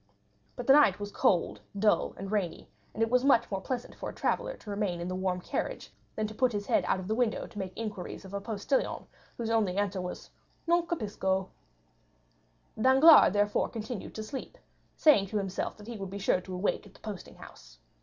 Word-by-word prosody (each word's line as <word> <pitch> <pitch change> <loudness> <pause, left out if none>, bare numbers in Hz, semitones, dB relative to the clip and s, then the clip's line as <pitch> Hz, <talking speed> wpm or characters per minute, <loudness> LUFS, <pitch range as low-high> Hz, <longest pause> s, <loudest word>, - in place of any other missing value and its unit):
But 245 - -6
the 270 - +7
night 275 -10 +5
was 205 0 -5
cold, 175 -3 +1 0.2
dull, 210 +1 +2
and 195 +1 -6
rainy, 200 -5 -2 0.2
and 225 - -1
it 225 - +1
was 250 0 +4
much 240 -5 +4
more 195 -1 -2
pleasant 245 +3 -4
for - - -6
a - - -10
traveller - - -1
to 210 - -12
remain 200 -4 -1
in 170 - -4
the 185 - -3
warm 185 -1 -1
carriage - - -4 0.2
than 215 - -1
to 215 - -5
put 250 +1 +1
his 205 -1 -2
head - - +2
out - - +1
of 185 - -7
the 215 - 0
window 230 -1 0
to 205 - -9
make 190 -2 -4
inquiries 210 -4 -5
of 190 - -11
a 200 - -3
postilion 220 +5 -1 0.3
whose 230 -1 -2
only 210 -5 +1
answer 200 -2 0
was 180 0 -7 0.3
"Non 340 0 +2
capisco." 190 - -1 1.3
50241m - - -2
Danglars 270 - +8
therefore 205 0 +1
continued 225 -1 -6
to 220 - -4
sleep, 265 - -7 0.4
saying 275 -11 +5
to 210 - -2
himself 195 -2 -3
that 210 - -12
he 235 0 -6
would 195 -2 -5
be 200 - -6
sure 185 -2 +1
to 185 0 -7
awake 200 +2 -1
at 195 - -19
the - - -17
posting 205 -4 -8
house. - - -14
205 Hz, 215 wpm, -30 LUFS, 190-235 Hz, 1.3 s, Danglars